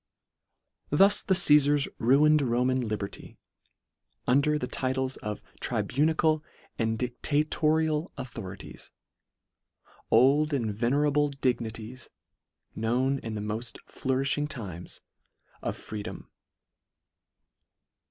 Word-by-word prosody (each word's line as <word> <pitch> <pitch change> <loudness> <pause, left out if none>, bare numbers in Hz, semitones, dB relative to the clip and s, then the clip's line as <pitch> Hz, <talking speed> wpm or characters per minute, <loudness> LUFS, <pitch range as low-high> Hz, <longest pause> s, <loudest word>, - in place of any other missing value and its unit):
Thus 195 +7 +5
the 190 - +2
Ca?fars 145 -4 +6
ruined 150 +5 +4
Roman 125 0 0
liberty, 105 -2 -6 0.9
under 140 +4 +3
the 125 - -3
titles 130 +1 -2
of 105 -1 -6 0.2
tribunical 155 +2 +1 0.4
and 115 -1 0
dictatorial 155 - 0
authorities, 105 -8 -8 1.2
old 140 +6 +4
and 115 -6 -1
venerable 145 +6 +1
dignities, 120 -3 -3 0.6
known 125 +5 0
in 115 -3 -6
the 105 - -4
moft 110 +3 -4
flourilhing 135 +3 -1
times 95 - -8 0.6
of - - -3
free 105 -1 -7
dom. - - -9
130 Hz, 90 wpm, -28 LUFS, 115-150 Hz, 1.2 s, Ca?fars